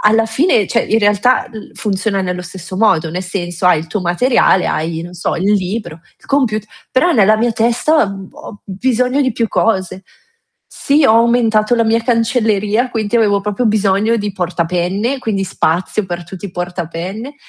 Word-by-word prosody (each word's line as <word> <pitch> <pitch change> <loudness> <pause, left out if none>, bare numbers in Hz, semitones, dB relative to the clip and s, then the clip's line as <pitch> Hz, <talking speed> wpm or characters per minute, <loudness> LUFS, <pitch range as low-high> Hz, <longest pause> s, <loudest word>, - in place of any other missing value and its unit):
alla 220 +1 +3
fine, 225 - +2
cioè 235 - +1
in 220 - +1
realtà, 210 +5 +2
l 220 -3 -10
funziona 200 -1 -1
nello 180 -1 -3
stesso 185 +1 -9
modo, 170 -7 +2
nel 180 +3 -4
senso: 180 -1 -3
hai 180 -3 +5
il 160 - -6
tuo 195 +6 -3
materiale, 185 +2 +2
hai 160 +1 -2
non 175 +1 -9
so 175 - -2
il 195 +4 +1
libro, 195 -3 -3 0.2
il - - -22
comput 235 -7 0 0.3
però 345 +7 +2
nella 215 -1 +4
mia 235 +2 0
testa, 235 +7 +2
uhm, 195 -1 -8
ho 205 - -12
bisogno 250 +7 0
di 260 -4 +1
più 230 0 -1
cose. 190 -4 -1 0.7
Sì, 285 +1 +1
ho 220 - +5
aumentato 230 -1 +3
la 230 -1 +2
mia 225 +1 +1
cancelleria, 230 -1 +1
quinti 220 -1 -1
avevo 205 -3 +2
proprio 210 +4 -1
bisogno 210 +1 +2
di 205 -2 -3
porta 180 -2 -2
penne, 190 +9 -1
quindi 205 -5 -2
spazio 180 +3 -1
per 175 -1 -5
tutti 185 +3 -10
i - - -10
porta 175 -1 -4
penne, 195 - -6
210 Hz, 180 wpm, -16 LUFS, 185-230 Hz, 0.7 s, hai